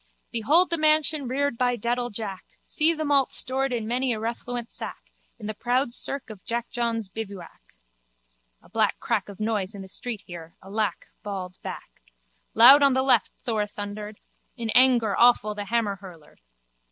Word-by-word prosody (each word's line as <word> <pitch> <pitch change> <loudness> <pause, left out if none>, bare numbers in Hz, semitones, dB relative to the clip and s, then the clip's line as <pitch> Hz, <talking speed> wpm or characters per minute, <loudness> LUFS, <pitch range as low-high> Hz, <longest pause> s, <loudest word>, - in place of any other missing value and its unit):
Behold 305 +11 +3
the 335 - +3
mansion 310 -2 +3
reared 270 -1 -1
by 245 -1 +2
dedal 240 +2 -1
Jack 205 -3 -6 0.2
See 315 +1 +3
the 310 -2 -3
malt 280 -2 +2
stored 265 +1 +1
in 230 -3 -2
many 250 +2 0
a 220 - -4
refluent 235 +1 -4
sack, - - -8 0.3
In 220 - -10
the 215 - -3
proud 245 +3 0
cirque 270 -1 -3
of 200 -4 -12
Jackjohn's 235 -2 -1
bivouac. 195 -3 -8 1.0
A - - -19
black 215 +1 +1
crack 215 -4 -1
of 200 - -11
noise 215 -2 -2
in 195 - -7
the - - -11
street 220 +2 -5
here, 170 -3 -10
alack, 200 -1 -2 0.2
bawled 185 -3 -6
back. - - -9 0.5
Loud 255 +6 +9
on 275 -2 +4
left 260 -4 +3
Thor 215 -3 -1
thundered: 210 +1 -7 0.4
in 230 -2 -3
anger 240 -5 +4
awful 235 -3 +4
the 205 0 -5
hammerhurler. 200 -7 -4
230 Hz, 160 wpm, -25 LUFS, 205-255 Hz, 1.0 s, Loud